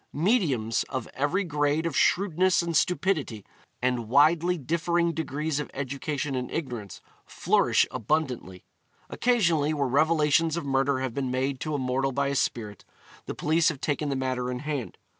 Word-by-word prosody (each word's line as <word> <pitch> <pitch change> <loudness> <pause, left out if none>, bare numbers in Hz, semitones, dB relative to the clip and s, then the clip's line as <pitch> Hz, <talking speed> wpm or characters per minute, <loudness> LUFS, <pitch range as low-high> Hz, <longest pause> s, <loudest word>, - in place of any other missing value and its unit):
'Mediums' 145 - +1
of 130 -4 -4
every 150 +9 0
grade 150 -1 0
of 165 - -2
shrewdness 185 -1 +2
and 170 -1 -3
stupidity, 155 - 0 0.4
and 125 -3 0
widely 165 +6 +4
differing 170 +3 0
degrees 155 -1 -2
of 150 - -4
education 140 +1 -3
and 125 -1 -3
ignorance, 120 - -5 0.2
flourish - - +2
abundantly. 125 - -2 0.5
Occasionally, 170 -11 +2
where 140 -2 0
revelations 155 +3 +2
of 170 - -4
murder 135 0 +1
have 130 -3 -3
been 135 -1 -2
made 130 +1 -1
to 155 0 -3
a - - 0
mortal 135 +1 0
by 140 +1 0
a 140 - -2
spirit, 105 -6 -2 0.4
the - - -4
police 160 +2 +2
have 155 -5 -5
taken 145 0 -1
the 140 - -1
matter 130 -1 -2
in 125 - -3
hand. 145 -5 -4
145 Hz, 160 wpm, -27 LUFS, 130-165 Hz, 0.5 s, widely